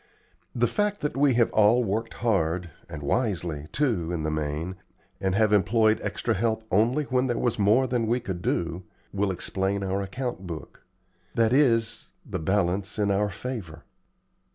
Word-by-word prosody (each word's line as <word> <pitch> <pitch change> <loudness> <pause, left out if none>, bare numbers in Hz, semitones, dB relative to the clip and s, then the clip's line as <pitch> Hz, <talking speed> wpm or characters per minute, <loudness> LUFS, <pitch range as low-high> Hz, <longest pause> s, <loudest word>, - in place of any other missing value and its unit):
The 120 0 +3
fact 205 - 0
that 150 - -2
we 135 -2 +3
have 120 -1 +3
all 110 +3 +4
worked 110 +2 -2
hard, 90 -5 +1 0.2
and 80 -3 -7
wisely, 85 - -1
too, 110 - 0
in 85 -3 -2
the 75 - -1
main, 75 +4 -3 0.4
and 95 -1 0
have 105 0 +3
employed 110 +2 +3
extra 105 +3 -1
help 110 +2 0
only 115 +9 +3
when 130 -1 +1
there 120 - -1
was 120 -2 0
more 105 +6 +4
than 120 -3 0
we 120 +3 +2
could 95 -7 -5
do, 85 0 -1 0.3
will 100 0 0
explain 95 +2 -1
our 95 +1 -1
account 100 -1 -4
book; 80 -3 -8 0.5
that 115 0 +3
is, 115 -5 +2
the - - -4
balance 95 +3 0
in 100 -1 +1
our 105 +1 +1
favor. 100 -5 -6
105 Hz, 165 wpm, -26 LUFS, 90-120 Hz, 0.5 s, all